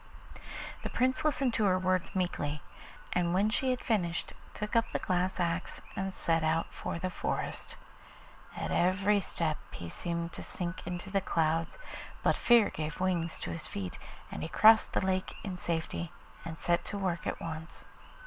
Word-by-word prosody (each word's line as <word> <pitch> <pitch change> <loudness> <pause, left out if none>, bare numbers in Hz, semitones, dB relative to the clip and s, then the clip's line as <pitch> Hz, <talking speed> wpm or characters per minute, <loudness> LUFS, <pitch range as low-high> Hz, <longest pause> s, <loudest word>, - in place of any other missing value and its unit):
The - - -3
Prince 255 +1 +2
listened 275 -5 +2
to 220 - +2
her 185 -2 +4
words 185 0 0
meekly, 150 -5 -1 0.5
and 175 0 +2
when 205 +3 +3
she 260 +3 +1
had 255 -1 0
finished 175 -7 0 0.2
took 210 +2 -3
up 230 0 +4
the - - +1
glass 185 +1 0
axe 170 0 -1 0.2
and 195 0 -1
set 165 -3 +1
out 160 +1 +1
for - - -3
the 185 +2 -2
forest. - - -2 0.8
At - - -2
every 195 +3 +3
step 160 -4 -1
he 85 - -6
seemed 170 - -2
to - - -6
sink 175 -1 -4
into 180 +2 -4
the 195 -1 +2
clouds, 165 -2 +1 0.5
but - - +4
fear 235 -3 +5
gave 155 0 -4
wings 175 -3 0
to - - -3
his 165 - -2
feet, 95 -3 -5 0.3
and - - -5
he 160 - -3
crossed 220 +4 +7
the - - +1
lake 185 0 0
in 185 -3 -4
safety 170 0 -2 0.3
and 165 -1 -6
set 170 +3 +2
to 205 - -3
work 185 -4 -1
at - - -2
once. 160 0 -6
180 Hz, 175 wpm, -32 LUFS, 165-195 Hz, 0.8 s, crossed